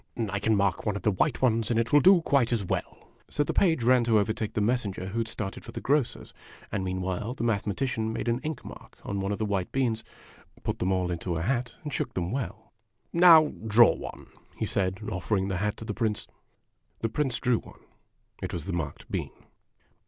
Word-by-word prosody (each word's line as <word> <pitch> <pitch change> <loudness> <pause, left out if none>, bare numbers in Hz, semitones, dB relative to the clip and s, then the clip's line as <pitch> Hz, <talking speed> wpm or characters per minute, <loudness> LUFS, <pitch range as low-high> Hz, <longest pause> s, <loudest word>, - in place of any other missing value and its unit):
" 110 -3 0
I 100 - -1
can 110 +2 +2
mark 100 -3 +1
one 105 -2 -1
of 100 - -5
the 105 - +3
white 130 +8 0
ones, 115 -3 +2
and 115 -1 +2
it 115 +3 -1
will 145 - +8
do 185 +2 +6
quite 135 -6 +2
as 110 -5 0
well." - - -4 0.2
So 145 - +1
the - - -2
page 165 -9 +3
ran 125 0 +5
to 115 -2 +4
overtake 110 +1 0
the - - +1
messenger 105 -4 -1
who 115 +4 -2
had 115 - -1
started 100 -3 -5
for - - -9
the - - -4
grocer's 140 -2 0 0.4
and 100 - -1
meanwhile 95 +5 -2
the 115 - -4
Mathematician 110 +1 0
made 110 - -4
an 120 +1 +1
ink 155 +1 -5
mark - - -11
on 100 - -3
one 95 +1 -1
of 100 - -1
the 110 - -1
white 100 -3 -1
beans, 120 -5 0 0.6
put - - -2
them 95 - +1
all 90 -1 0
into 85 0 -2
a 80 - -2
hat, 125 +2 -1
and 150 -3 -5
shook - - -2
them 90 0 -1
well. 115 -4 -5 0.2
" 120 - -48
Now 165 -3 +7
draw 115 +2 +7
one," - - -9 0.3
he - - -1
said, 95 -1 0
offering 95 +1 -1
the 95 - -1
hat 105 +2 -1
to 110 - -8
the - - -3
Prince. 110 -4 -1 0.8
The 115 - +1
Prince 130 0 0
drew 125 -3 +2
one. - - -15 0.6
It - - -4
was 85 -3 -4
the 95 - -3
marked 80 -5 -4
bean. - - -2
110 Hz, 225 wpm, -28 LUFS, 95-125 Hz, 0.8 s, will